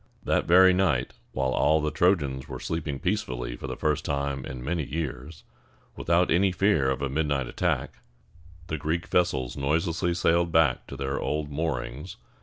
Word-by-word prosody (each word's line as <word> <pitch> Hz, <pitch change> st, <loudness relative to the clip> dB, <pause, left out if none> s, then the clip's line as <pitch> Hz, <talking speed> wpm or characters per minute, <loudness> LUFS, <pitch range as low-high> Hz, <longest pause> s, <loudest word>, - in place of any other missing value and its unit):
That -, -, +1 dB
very 90 Hz, +2 st, +7 dB
night, 80 Hz, -9 st, +1 dB, 0.2 s
while 65 Hz, 0 st, -1 dB
all 80 Hz, +4 st, +3 dB
the 75 Hz, 0 st, -1 dB
Trojans 75 Hz, -5 st, +1 dB
were -, -, -6 dB
sleeping 80 Hz, -4 st, -3 dB
peacefully -, -, -2 dB
for -, -, -7 dB
the -, -, -5 dB
first 75 Hz, -2 st, 0 dB
time 70 Hz, -2 st, -2 dB
in 65 Hz, -1 st, -7 dB
many 85 Hz, +1 st, -1 dB
years, 75 Hz, 0 st, -5 dB, 0.5 s
without 85 Hz, +2 st, +2 dB
any 95 Hz, +3 st, +3 dB
fear 90 Hz, -7 st, +2 dB
of 65 Hz, +1 st, -2 dB
a -, -, +1 dB
midnight 70 Hz, -2 st, 0 dB
attack, -, -, -2 dB, 0.7 s
the 80 Hz, -3 st, -4 dB
Greek 80 Hz, +5 st, -1 dB
vessels 65 Hz, -9 st, +1 dB
noiselessly 85 Hz, +5 st, 0 dB
sailed 85 Hz, 0 st, +2 dB
back 80 Hz, -6 st, +2 dB
to -, -, -8 dB
their 70 Hz, 0 st, -2 dB
old 75 Hz, -1 st, -2 dB
moorings. 75 Hz, +1 st, -4 dB
75 Hz, 165 wpm, -26 LUFS, 65-85 Hz, 0.7 s, very